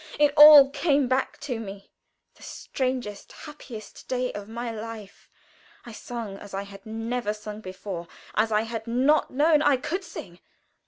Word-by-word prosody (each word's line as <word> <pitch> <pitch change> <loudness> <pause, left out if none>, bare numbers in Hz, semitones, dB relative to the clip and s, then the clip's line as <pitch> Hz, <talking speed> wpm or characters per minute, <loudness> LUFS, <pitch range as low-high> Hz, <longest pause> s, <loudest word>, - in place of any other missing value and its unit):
It 295 -1 +3
all 295 -2 +10
came 280 -1 +1
back 260 +1 -1
to 255 -6 -4
me 200 -2 -9 0.4
the - - -24
strangest, 255 -6 -4
happiest 265 -8 -11
day 250 -1 -2
of 205 0 -8
my 235 +1 -4
life. 220 -2 -9 0.6
I 240 - -9
sung 225 -3 -7
as 200 -1 -9
I 195 - -3
had 200 0 -13
never 225 0 -3
sung 210 0 -8
before 185 -2 -7 0.3
as 220 +1 +1
I 210 0 +3
had 225 0 -6
not 265 +6 +2
known 300 +2 +3
I 285 -3 +4
could 360 +9 -4
sing. 185 - -10
235 Hz, 160 wpm, -26 LUFS, 210-275 Hz, 0.6 s, all